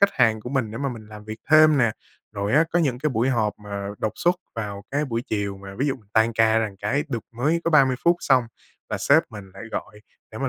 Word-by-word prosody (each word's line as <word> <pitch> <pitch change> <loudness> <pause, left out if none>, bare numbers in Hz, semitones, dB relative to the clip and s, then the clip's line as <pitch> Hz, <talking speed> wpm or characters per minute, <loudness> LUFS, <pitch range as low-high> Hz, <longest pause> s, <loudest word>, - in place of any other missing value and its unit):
khách 200 0 +5
hàng 110 -2 +3
của 120 - -7
mình 130 -6 -1
để 115 - -6
mà 140 - -1
mình 115 -4 -8
làm 105 -1 -11
việc 110 +1 -7
thêm 155 -1 +7
nè. 115 -3 +3 0.4
Rồi 100 0 -2
á 155 +4 +5
có 175 - +3
những 135 -7 +1
cái 150 +3 0
buổi 120 +1 +1
họp 110 -5 +1
mà 100 -1 -6
đột 110 -1 -1
xuất 175 +8 +2 0.2
vào 100 -3 -5
cái 145 +2 0
buổi 115 -4 -3
chiều 100 -4 -2
mà, 95 0 -9
ví 140 - +1
dụ, 135 - +1 0.2
tan 110 +1 +3
ca 110 0 +3
ra 110 -1 0
cái 140 +8 0
được 120 -6 -4
mới 155 +7 +1
có 170 - +1
30 135 -5 +5
phút 170 0 +5
xong 130 -3 +3 0.4
là - - -2
sếp 155 +4 +4
mình 100 -4 -10
lại 100 - -9
gọi 105 -1 -6 0.3
để 110 - -7
mà 135 - -1
115 Hz, 260 wpm, -24 LUFS, 105-140 Hz, 0.4 s, thêm